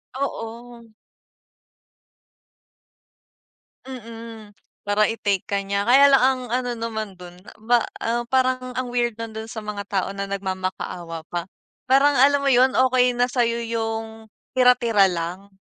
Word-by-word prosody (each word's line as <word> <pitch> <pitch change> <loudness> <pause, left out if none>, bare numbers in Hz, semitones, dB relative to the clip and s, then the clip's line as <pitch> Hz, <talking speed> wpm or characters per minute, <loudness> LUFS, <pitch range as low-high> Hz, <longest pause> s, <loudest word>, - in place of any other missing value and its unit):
Oo. 235 -3 -6 3.0
Mm. 230 -3 -10 0.3
Para 205 +1 +2
i-take 205 -4 -1
ka 200 0 -1
niya. 200 +1 -2
Kaya 275 +4 +7
lang 270 - +6
ang 260 0 +2
ano 245 +1 -1
naman 220 -3 -4
dun, 180 0 -12
na - - -12
ba 240 +2 +3 0.5
parang 255 0 0
ang 250 0 -3
weird 240 -2 0
nun 230 -1 -6
dun 220 - -5
sa 220 -1 -7
mga 210 -1 -5
tao 195 -2 -1
na 200 0 -3
nagmamakaawa 185 -3 -4
pa. 175 -1 -3 0.4
Parang 275 +2 +4
alam 280 +2 +5
mo 280 - +1
yun, 260 0 +4
okey 255 -1 +3
na 245 +1 +1
sa'yo 235 -2 0
yung 225 -1 -4 0.3
tira-tira 245 -5 +5
lang. 180 +3 -5
230 Hz, 135 wpm, -23 LUFS, 200-250 Hz, 3.0 s, Kaya